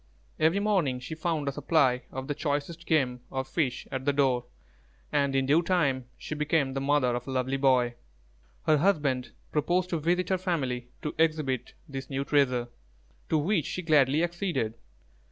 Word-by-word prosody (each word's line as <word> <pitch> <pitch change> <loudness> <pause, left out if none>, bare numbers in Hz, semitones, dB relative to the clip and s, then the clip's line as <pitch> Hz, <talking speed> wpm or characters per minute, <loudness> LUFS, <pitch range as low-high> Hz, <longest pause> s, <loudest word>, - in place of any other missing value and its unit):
Every 165 +5 +3
morning 185 -12 +1
she 125 +5 -7
found 160 -2 -2
a - - +1
supply 130 -4 +2
of 130 0 -5
the 145 - -1
choicest 150 +4 -3
game 130 -6 +2
or 130 0 -2
fish 135 -1 -2
at 130 0 -3
the 145 - +2
door, 130 -4 +2 0.7
and 140 -2 +1
in 135 0 +2
due 150 +5 +4
time 145 -8 +1
she - - -6
became 150 -2 +1
the 135 - -2
mother 135 -3 +2
of 120 +2 -5
a - - -4
lovely 130 +1 0
boy. 130 -3 +3 0.7
Her 155 - +5
husband 145 -7 +1 0.2
proposed 175 +5 +1
to 165 - 0
visit 175 +3 +1
her 190 -1 +1
family 135 -10 -2 0.2
to 150 - -2
exhibit 155 -6 0
this 135 -2 -6
new 135 0 -2
treasure, 130 -5 +2 0.6
to 160 - +3
which 165 +1 +1
she 185 - -4
gladly 150 -1 +4
acceded. 175 - -1
145 Hz, 170 wpm, -28 LUFS, 130-165 Hz, 0.7 s, Her